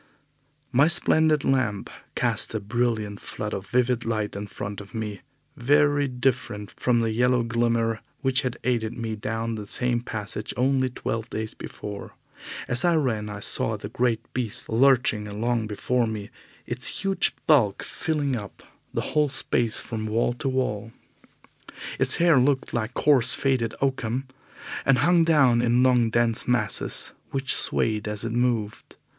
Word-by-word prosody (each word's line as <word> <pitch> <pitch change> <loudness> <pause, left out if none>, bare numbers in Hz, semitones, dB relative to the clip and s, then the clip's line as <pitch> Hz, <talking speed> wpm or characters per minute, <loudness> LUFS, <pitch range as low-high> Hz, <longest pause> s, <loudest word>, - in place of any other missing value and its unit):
My 135 +4 +4
splendid 160 -3 +3
lamp 130 -7 0 0.3
cast - - 0
a - - 0
brilliant 110 -2 -2
flood 105 0 -5
of 95 0 -5
vivid 125 +1 +1
light 110 -3 -2
in 100 +1 -5
front 100 +1 -6
of 100 +3 -13
me, 105 -2 -5 0.3
very 145 +2 +3
different 125 -5 -2
from 120 -2 +1
the 115 -1 0
yellow 125 +2 +2
glimmer 115 -1 0 0.2
which 130 -1 +2
had 125 -2 -3
aided 115 -3 -1
me 115 -2 -3
down 115 +2 -3
the 105 -2 -6
same 120 +2 +1
passage 105 -3 -5
only 130 +1 +2
twelve 115 -2 -4
days 110 0 -4
before. 105 -1 -8 0.5
As 120 - +3
I 175 -1 +3
ran, 115 -9 -1
I 105 -1 -7
saw 110 +1 0
the 105 0 -8
great 120 -1 0
beast 120 -5 -4
lurching 120 -3 +3
along 110 +2 -1
before 120 +3 0
me, 105 -2 -6 0.3
its - - +1
huge 195 -2 +1
bulk 125 - +3
filling 145 -4 -2
up 105 -4 -8 0.3
the - - -2
whole 150 -1 +3
space 120 -4 +1
from 110 -2 -5
wall 115 +2 0
to 135 +3 -3
wall. 115 -4 -2 1.1
Its - - +5
hair 170 -5 +4
looked 135 +1 +1
like 115 -1 -2
coarse 135 -6 +4
faded 130 -5 0
oakum, 130 -1 -1 0.6
and 135 -1 +3
hung 170 +4 +4
down 135 -8 +4
in 120 +1 +3
long, 125 -3 +3
dense 115 0 +2
masses 125 -4 +1 0.2
which 135 -1 +1
swayed 110 -1 +2
as 105 +1 -2
it 115 - -3
moved. 115 -3 -2
120 Hz, 155 wpm, -25 LUFS, 110-130 Hz, 1.1 s, Its